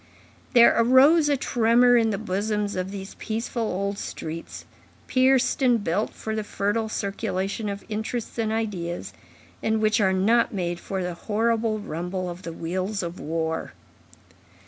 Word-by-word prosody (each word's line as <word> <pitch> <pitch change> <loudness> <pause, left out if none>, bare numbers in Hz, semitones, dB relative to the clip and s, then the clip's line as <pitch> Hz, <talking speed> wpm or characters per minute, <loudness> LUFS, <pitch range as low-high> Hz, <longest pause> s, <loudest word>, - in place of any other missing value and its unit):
There 235 -2 +7
arose 275 +7 +5
a 285 - +2
tremor 245 0 +4
in 230 -2 +4
the 205 - -1
bosoms 210 +1 -2
of 185 0 -2
these 195 0 -7
peaceful 230 +2 -3
old 200 -1 -2
streets, 165 +1 -6 0.4
pierced 260 +1 +3
and 240 -5 +3
built 200 +6 0
for 220 - -4
the 215 - -2
fertile 210 +2 -1
circulation 200 0 -2
of 200 0 -6
interests 225 +2 -4
and 220 -1 0
ideas, 195 -6 -3 0.5
and 220 0 +1
which 215 +1 +2
are 190 -2 +3
not 220 +5 +3
made 175 -2 -2
for 190 0 -4
the 180 0 -3
horrible 220 +4 0
rumble 180 -1 -4
of 175 +1 -9
the 170 - -6
wheels 185 +5 -3
of 170 +1 -6
war. 160 +1 -3
210 Hz, 150 wpm, -25 LUFS, 185-230 Hz, 0.5 s, There